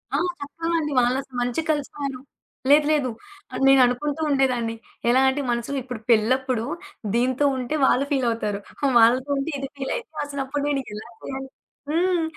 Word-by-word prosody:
ఆ! - - +3 0.2
చక్కగాండి. 330 +1 -2
వాళ్ళసల 255 +2 -1
మంచి 245 +6 0
కలిసిపోయారు. 285 -3 -2 0.5
లేదు, 295 +1 +6
లేదు. 285 -5 +2 0.4
ఆహ్, - - -3
నేననుకుంటూ 270 +3 +4
ఉండేదాన్ని. 250 -5 +1 0.3
ఎలా 260 +2 +5
అంటే 275 +2 -1
మనసులో, 240 +4 -1
ఇప్పుడు 250 -3 -6
పెళ్ళప్పుడు, 240 +1 +2 0.5
దీంతో 255 +4 +2
ఉంటే 255 +3 -2
వాళ్ళు 265 +2 +3
ఫీలవుతారు, 230 -6 0 0.4
వాళ్ళతో 250 +5 +4
ఉంటే 275 +4 -2
ఇది 275 - -4
ఫీలైద్ది, 280 - -3 0.2
అసలప్పుడు 280 0 -3
నేను 285 -2 +1
ఎలా 210 +2 -7
చేయలి 270 0 -6 0.4
హ్మ్. 345 +2 +2
270 Hz, 135 wpm, -24 LUFS, 245-290 Hz, 0.5 s, లేదు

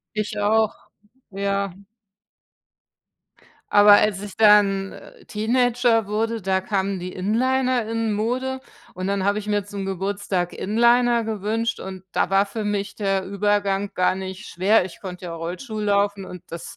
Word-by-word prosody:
Ich 215 0 -3
auch, 215 +1 +2 0.6
ja. 200 -1 -2 2.0
Aber 205 0 +8
als 205 -1 +4
ich 205 - -8
dann, 205 -3 +4
äh, - - -14
Teenager 235 0 +1
wurde, 225 +2 -1
da 190 0 0
kamen 195 -1 -1
die 180 +1 -6
Inliner 250 +4 0
in 225 -1 -1
Mode 255 +5 -2 0.3
und 185 +1 -4
dann 200 -1 -1
habe 205 +1 +1
ich 210 - -7
mir 205 -1 0
zum 200 -1 -6
Geburtstag 195 -1 -2
Inliner 235 +2 +3
gewünscht 220 +2 -2
und 190 -1 -8
da - - 0
war 195 +1 +3
für 215 +1 -5
mich 205 -1 -2
der 195 -2 -1
Übergang 200 0 0
gar 185 0 +2
nicht 190 +1 -7
schwer. 190 +2 +2
Ich 175 - -13
konnte 180 -1 -7
ja 165 - -5
Rollschuhe 210 +7 -5
laufen 200 -1 +1
und 180 -2 -10
das 170 - -8
205 Hz, 150 wpm, -23 LUFS, 195-220 Hz, 2.0 s, Aber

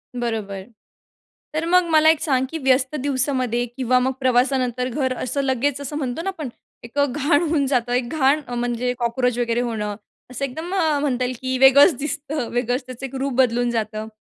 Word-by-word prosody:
बरोबर. 220 -5 -3 0.9
तर 310 +1 -1
मग 360 0 +4
मला 315 0 +6
एक 320 -1 +3
सांग 265 -4 +1
की 325 - -4
व्यस्त 265 0 +2
दिवसामध्ये 260 -3 0
किंवा 255 -1 +2
मग 260 +1 +1
प्रवासानंतर 250 -1 +1
घर 260 0 -1
असं 265 +3 -1
लगेच 275 +1 0
असं 285 +1 -5
म्हणतो 265 0 -3
ना, 390 - -1
आपण 315 -8 -5 0.3
एक 235 +4 -5
घाण 285 +2 +2
होऊन 310 -4 +1
जातं. 245 -3 0
एक 245 -1 0
घाण 295 0 +2
म्हणजे 245 0 -1
कॉकरोच 245 +1 0
वगैरे 235 0 0
होणं 215 -4 -3 0.4
असं 255 +2 -2
एकदम 315 +6 -6 0.3
म्हणता 255 -4 0
येईल 250 +1 -3
की 260 0 -1
वेगळंच 270 +4 +7
दिसतं, 295 -2 -3
वेगळंच 245 +2 -1
त्याचं 255 +1 -7
एक 270 - -8
रूप 275 -1 -1
बदलून 245 -1 +2
जातं. 215 -1 -3
260 Hz, 175 wpm, -22 LUFS, 245-285 Hz, 0.9 s, वेगळंच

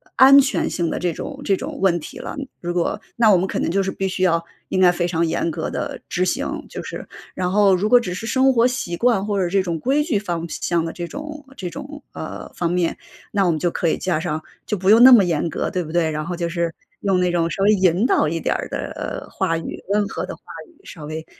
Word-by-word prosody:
安 270 +1 +8
全 275 0 +1
性 170 -2 -1
的 - - -3
这 180 -1 0
种 275 - -7
这 195 -6 +1
种 - - -6
问 175 -3 +3
题 150 - -10
了。 - - -7 0.2
如 175 0 -3
果 180 +4 -1 0.2
那 225 -2 +5
我 195 - +7
们 185 - +1
可 - - -3
能 - - 0
就 195 +3 +1
是 190 - -2
必 195 - -2
须 185 0 -2
要 170 -2 +2 0.2
应 185 - -1
该 180 -1 +7
非 175 0 -1
常 170 -1 0
严 170 +1 -1
格 160 0 -3
地 - - -4
执 180 - 0
行， - - -1 0.2
就 - - -6
是 - - -7 0.3
然 180 -1 -1
后 200 -1 +5
如 190 +4 +1
果 245 +2 +6
只 185 -6 -4
是 205 +5 -5
生 260 +2 +3
活 235 +1 +4
习 175 -9 -3
惯 235 -5 +2
或 205 -1 -1
者 175 - 0
这 195 0 +2
种 170 -3 -3
规 280 - +1
矩 240 -11 0
方 170 -4 -3
向 170 0 -1
的 165 - -3
这 175 -1 -5
种 300 - -8
这 180 -2 -4
种， 290 - -9
呃， - - -7
方 170 -1 -1
面， 175 -1 0 0.4
那 200 -2 +2
我 - - +3
们 155 - -1
就 175 +1 0
可 170 - -1
以 - - +1
加 175 -4 -1
上 155 -2 -3 0.2
就 210 - -1
不 190 +1 0
用 225 - +7
那 260 - +10
么 215 -5 +8
严 165 -1 0
格， - - -2
对 180 -2 -1
不 155 - -8
对？ 165 -2 +2
然 155 0 -3
后 175 0 -3
就 170 -1 -2
是 170 -1 -2 0.3
用 195 -2 +2
那 180 -1 +2
种 170 -1 +1
稍 195 - -2
微 210 - +5
引 190 +1 +3
导 155 - +3
一 165 +2 -2
点 - - 0
的 - - -5
话 165 0 0
语， 165 - -6
温 205 0 +2
和 - - -4
的 - - -7
话 - - -26 0.3
语， 340 - -25
稍 155 -5 -9
微 155 +1 -6
180 Hz, 285 characters per minute, -21 LUFS, 170-210 Hz, 0.4 s, 那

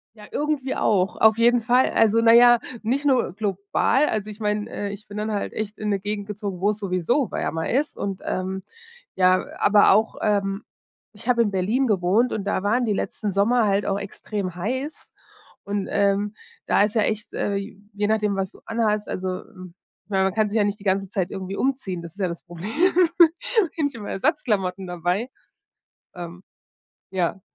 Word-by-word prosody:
Ja, 210 -1 -13
irgendwie 295 -3 -1
auch. 195 -1 +1
Auf 220 0 +5
jeden 240 +1 +5
Fall. 245 +3 +3
Also, 225 +1 +3
na 230 0 +6
ja, 240 0 +7 0.2
nicht 265 +6 0
nur 255 -9 +2
global. 205 +7 +1
Also, 215 -1 -2
ich 210 +1 -10
meine, 210 0 -1
äh, 205 0 -4
ich 210 +1 -11
bin 205 +1 -8
dann 215 +1 -2
halt 205 - -3
echt 215 -1 -5
in 210 -1 -2
'ne 200 -1 +1
Gegend 205 +1 -4
gezogen, 200 -3 -5
wo 205 - +3
es 210 - -1
sowieso 200 - 0
wärmer 160 0 -2
ist 285 +5 0
und, 195 -1 -4
ähm, 190 +1 -3 0.6
ja, 185 0 +5
a - - -12
aber 205 0 +6
auch, 220 +3 +2
ähm 200 -1 0 0.5
ich 225 +4 -10
habe 235 -1 +4
in 205 -3 -1
Berlin 215 +9 +1
gewohnt 205 +4 +2
und 205 - -2
da 200 -1 -1
waren 240 +4 +2
die 210 - +1
letzten 205 +1 -2
Sommer 220 +4 +2
halt 200 +1 +1
auch 195 0 0
extrem 200 -2 -5
heiß 260 - -4 0.5
und, 200 -1 -3
ähm, 200 +1 +1 0.3
da - - +4
ist 210 0 +1
ja 215 - +4
echt, 215 0 -2
äh, 200 - -1 0.4
je 205 +1 -1
nachdem, 210 -2 +1
was 190 -1 -2
du - - -18
anhast. 215 -2 0
Also, 185 0 -3 0.2
m 185 -1 -13 0.3
man 190 -1 +1
kann 215 -1 +2
sich 215 - -3
ja 210 - +4
nicht 205 0 -2
die - - -13
ganze 195 0 +1
Zeit 190 -2 -2
irgendwie 190 +1 -5
umziehen. 255 -10 -2
Das 165 -1 -9
ist - - -22
ja 185 - 0
das 170 -1 -6
Problem, 175 +4 -7
habe 345 - +3
nicht 285 - -1
immer 215 -3 -7
Ersatzklamotten 195 - 0
dabei. 180 +7 -1 0.9
Ähm, 175 +1 -8 0.7
ja. 190 0 -1
205 Hz, 190 wpm, -23 LUFS, 195-230 Hz, 0.9 s, ja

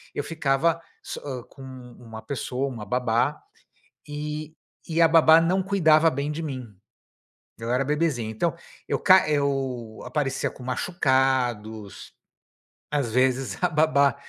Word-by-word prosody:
eu 145 - -2
ficava 160 +1 0 0.2
so - - -6
hã, 130 -4 -5
com 135 - -15
uma 125 -3 -11
pessoa, 135 -1 -3
uma 115 -5 -6
babá, 125 +4 0 0.7
e 150 +1 -5 0.3
e 165 +1 +2
a - - +8
babá 160 0 +7
não 185 +3 +1
cuidava 165 -5 +4
bem 140 +2 -3
de 165 +2 -5
mim, 130 -8 -6 0.8
eu 115 +1 -5
era 130 +2 +1
bebezinho. 145 -6 0
Então, 160 +11 -1 0.3
eu - - 0
ca 190 -5 +5
eu 135 -6 -1
aparecia 140 -3 -1
com 125 - -13
machucados, 125 - -1 0.8
às 140 -6 -1
vezes, 130 -4 +1
a - - +5
babá 150 -3 +3
135 Hz, 135 wpm, -25 LUFS, 125-155 Hz, 0.8 s, a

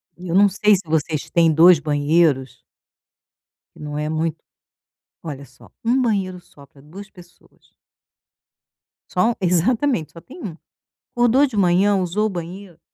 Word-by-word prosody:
Eu 175 -1 -7
não 200 +1 +6
sei 210 +2 +3
se 185 - -4
vocês 155 -1 -2
têm 165 -1 +3
2 170 +1 +6
banheiros 145 -4 0 1.1
que - - -19
não 150 0 -6
é 150 0 -3
muito 160 0 -2 0.9
olha 140 -3 -7
só, 130 0 -20
1 245 +3 +2
banheiro 195 -7 -1
só 145 -4 -19
pra 140 - -22
2 195 +8 -12
pessoas. 175 -3 -21 1.4
Só 220 +6 +1
u - - -6
exatamente, 190 - 0
só 165 - -12
tem 275 - -14
1. 165 -5 -7 0.5
Acordou 245 +3 +3
de 250 -7 -6
manhã, 195 +2 +3
usou 190 +3 -1
o - - -4
banheiro, 180 0 -8
175 Hz, 150 wpm, -20 LUFS, 155-205 Hz, 1.4 s, não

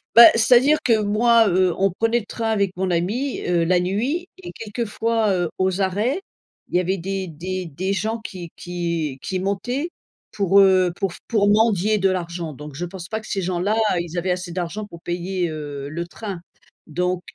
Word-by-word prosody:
Bah, 235 - +12
c'est-à-dire 250 +6 +5
que 225 -3 +3
moi, 225 +2 +4
heu, 180 -1 +3
on 195 0 +2
prenait 225 +6 +1
le 220 - -10
train 225 +1 -3
avec 200 -4 0
mon 190 0 0
ami, 205 +11 -1
heu, 175 -1 +1
la 175 +1 +3
nuit 245 - -1
et 375 - -9
quelquefois, 225 0 -1
heu, 175 -3 0
aux 190 +1 +1
arrêts, 210 - 0 0.5
il - - -6
y 180 - +5
avait 185 +2 0
des 190 +1 -3
des 180 +3 -5
des 185 +6 -2
gens 220 +4 -1
qui 185 -6 -8
qui 170 -5 -3
qui 185 - -3
montaient 245 - -2 0.4
pour, 200 -1 +3
heu, 185 -2 +5
pour 195 -1 -2
f - - -12
pour 205 -3 +2
mendier 215 -1 +3
de 195 - +3
l'argent, 170 -3 -3
donc 150 +1 -9
je 175 +5 -3
pense 175 0 -8
pas 220 +3 -3
que 220 - -12
ces 195 - -2
gens-là 185 +4 0 0.2
ils 170 0 -5
avaient 180 +2 -1
assez 180 -1 -3
d'argent 180 +4 -4
pour 170 -4 -12
payer, 175 +1 -2
heu, 145 -2 -6
le 170 +3 -4
train, 195 -1 -7 0.5
donc 180 +3 -1
190 Hz, 195 wpm, -22 LUFS, 175-215 Hz, 0.5 s, Bah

